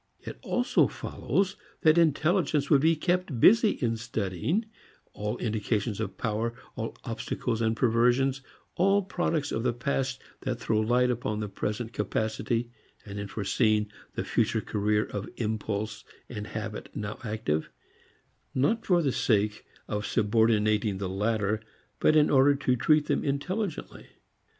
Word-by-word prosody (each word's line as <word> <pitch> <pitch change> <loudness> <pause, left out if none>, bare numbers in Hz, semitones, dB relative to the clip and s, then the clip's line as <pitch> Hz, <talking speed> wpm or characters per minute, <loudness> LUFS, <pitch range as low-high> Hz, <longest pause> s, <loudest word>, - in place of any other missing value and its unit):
It - - -8
also 245 +1 +2
follows 195 0 -2 0.2
that 155 -3 +5
intelligence 155 -2 +2
would 140 -3 +6
be 160 +2 +4
kept 175 -4 -1
busy 220 - +7
in 115 - -1
studying 115 - -2 0.5
all 105 +3 -3
indications 105 -1 -1
of 110 - -4
power, 115 +1 -1 0.2
all 115 -2 -5
obstacles 115 0 -3
and 110 0 +1
perversions, 125 +3 +2 0.3
all 195 +3 +3
products 165 -6 -1
of 115 - -1
the 120 0 +1
past 130 +1 -1 0.2
that 125 -3 -3
throw 110 -2 +1
light 125 +3 +3
upon 105 -3 -2
present 110 +3 -3
capacity, 115 +2 -1 0.3
and 100 -1 -6
in 100 - -4
forecasting 105 0 +1 0.2
the - - -1
future 115 0 +1
career 105 0 0
of 100 -1 -5
impulse 105 -1 -3 0.2
and 105 -3 -6
habit 110 0 -5
now 105 0 -4
active 105 -9 -2 0.9
not 220 - +2
for 175 -3 +3
the 140 - +2
sake 105 -3 0 0.2
of 105 -1 -2
subordinating 110 -2 +2
the 95 -1 -3
latter 105 +2 0 0.4
but 155 - +4
in 150 -1 +5
order 140 +1 +5
to 130 -2 +1
treat 150 +5 +3
them 145 -1 0
intelligently. 170 +6 -3
115 Hz, 140 wpm, -28 LUFS, 105-140 Hz, 0.9 s, busy